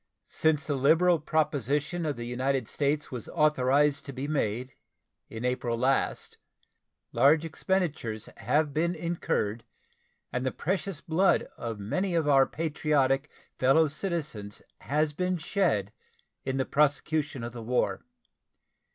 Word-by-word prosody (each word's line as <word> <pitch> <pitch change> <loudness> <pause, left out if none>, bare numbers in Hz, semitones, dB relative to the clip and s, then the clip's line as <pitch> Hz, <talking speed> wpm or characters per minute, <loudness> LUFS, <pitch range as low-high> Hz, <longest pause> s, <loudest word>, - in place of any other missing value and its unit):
Since 155 -3 +1
the 145 - -1
liberal 160 +6 +4
proposition 150 +2 0
of 145 - -1
the 120 - -6
United 130 +2 -1
States 145 +1 -1
was 125 -4 -6
authorized 145 -2 +2
to - - -4
be 135 +2 -4
made, 125 -3 -1 0.6
in 115 +2 -5
April 125 -2 -1
last, 130 +3 0 0.7
large 145 +6 +4
expenditures 155 - -2
have 150 -1 +1
been 170 +4 +1
incurred 155 -10 -2 0.7
and 125 - -1
the 130 - 0
precious 185 -1 -3
blood 185 +3 +2
of 115 -2 -5
many 180 - -1
of 160 -3 +1
our 135 -2 +5
patriotic 150 -3 0 0.3
fellow 135 +5 +5
citizens 150 - -4 0.2
has 150 +1 0
been 180 +3 -1
shed 155 - 0 0.5
in 130 0 -1
the 130 - +1
prosecution 150 -2 +1
of 120 0 -5
the 120 - -7
war. 125 +3 0
145 Hz, 130 wpm, -28 LUFS, 125-160 Hz, 0.7 s, our